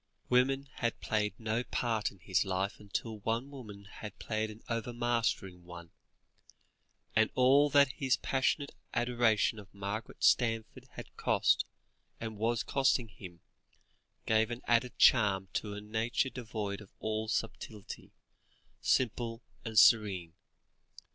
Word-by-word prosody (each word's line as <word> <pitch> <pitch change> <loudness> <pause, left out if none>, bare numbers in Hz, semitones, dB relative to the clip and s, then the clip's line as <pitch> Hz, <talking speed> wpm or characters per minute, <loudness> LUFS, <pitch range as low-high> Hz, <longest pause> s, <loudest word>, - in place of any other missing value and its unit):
Women 135 +2 +3
had 120 -1 -1
played 105 -2 -1
no 115 +1 -1
part 115 -4 -1
in 100 - -17
his 90 -1 +1
life, 95 0 -2
until 105 +2 -4
one 115 +6 -2
woman 105 -7 -10
had 105 +1 -9
played 110 -1 -2
an 110 +1 -12
overmastering 115 -6 -1
one; 85 -1 -11 1.2
and 110 0 +4
all 135 +3 +5
that 140 -1 +5
his 130 -3 +1
passionate 135 +2 0 0.2
adoration 120 -2 +2
of 100 -2 -13
Margaret 100 +3 -5
Stanforth 115 -2 +2
had - - -10
cost, - - +2 0.5
and 110 -1 -5
was 115 +1 +1
costing, 130 -4 +1
him, 90 -3 -12 0.8
gave 110 0 +3
an 120 +1 -6
added 120 +1 +1
charm 100 -5 +4
to 105 -1 -3
a 105 - -6
nature 115 +5 -1
devoid 110 -4 -4
of 100 - -13
all 110 0 -2
subtlety, 110 -2 -5 0.7
simple 115 -1 0 0.2
and 110 -2 -5
serene. 100 -7 +5
110 Hz, 130 wpm, -32 LUFS, 105-120 Hz, 1.2 s, all